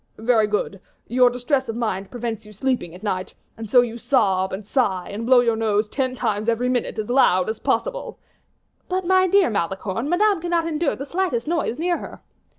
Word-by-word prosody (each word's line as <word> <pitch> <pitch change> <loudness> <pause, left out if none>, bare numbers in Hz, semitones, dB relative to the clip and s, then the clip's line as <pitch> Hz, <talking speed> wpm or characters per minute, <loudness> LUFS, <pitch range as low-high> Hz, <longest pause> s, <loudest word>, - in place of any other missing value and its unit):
"Very 220 -1 +2
good; 205 -2 -2 0.2
your 250 +1 +4
distress 250 +2 -1
of 225 - -3
mind 200 -5 -2
prevents 235 -3 -5
you 210 0 -14
sleeping 240 -6 -2
at 185 - -13
night, 185 -3 -3 0.2
and 225 -2 -8
so 245 +3 +6
you 235 -1 -4
sob, 190 -8 +1
and 195 +2 -6
sigh, 195 -7 0
and 220 +3 -5
blow 255 -1 +6
your 230 -2 +1
nose 215 -1 +1
ten 260 +2 -2
times 215 -2 -1
every 240 +2 0
minute 250 -1 -1
as 215 -1 -3
loud 215 -8 +3
as 220 - -8
possible." - - -2 0.7
"But, 370 0 -1
my 375 +1 +4
dear 385 -7 +3
Malicorne, 200 - -2
Madame 390 +1 +2
cannot 345 -1 0
endure 315 -2 0
the 275 - -6
slightest 300 -7 -1
noise 325 -7 -1
near 345 +2 0
her." - - -9
240 Hz, 195 wpm, -22 LUFS, 210-285 Hz, 0.7 s, so